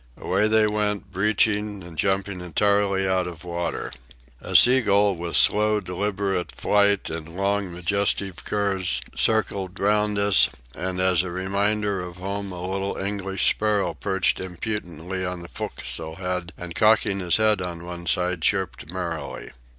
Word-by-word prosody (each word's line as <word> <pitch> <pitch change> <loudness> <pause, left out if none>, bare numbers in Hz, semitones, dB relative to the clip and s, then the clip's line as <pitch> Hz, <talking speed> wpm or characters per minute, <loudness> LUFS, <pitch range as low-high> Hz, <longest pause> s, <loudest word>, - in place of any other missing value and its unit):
Away 100 +3 +1
they 110 0 +4
went, 105 -2 -1
breaching 105 0 +1
and 85 -1 -10
jumping 95 +2 -1
entirely 95 +2 +1
out 95 -1 +1
of 85 -2 -9
water. 85 0 -4 0.5
A - - -5
sea 130 +2 +7
gull 100 -2 +3
with 85 0 -4
slow, 105 0 +5
deliberate 95 0 -2
flight 100 -3 +2
and 80 +1 -7
long, 100 0 -1
majestic 95 +1 -1
curves 95 -9 0 0.2
circled 100 -4 0
round 105 +1 +2
us, 100 -1 +5 0.3
and 90 0 -3
as 90 -2 +4
a 90 - -5
reminder 100 +2 0
of 90 -1 -8
home 100 +1 -4
a 90 0 -5
little 95 +1 -3
English 95 -1 -1
sparrow 105 -2 +1
perched 95 -2 0
impudently 95 -1 -4
on 90 -1 -4
the 85 - -10
fo'castle 80 0 -5
head, 90 -2 -3
and, 90 -1 -7
cocking 105 -1 +3
his 90 -2 +2
head 110 -3 +3
on 85 -1 -5
one 85 0 -7
side, 90 0 0
chirped 95 -3 -1
merrily. 85 -7 -5
95 Hz, 150 wpm, -24 LUFS, 90-100 Hz, 0.5 s, sea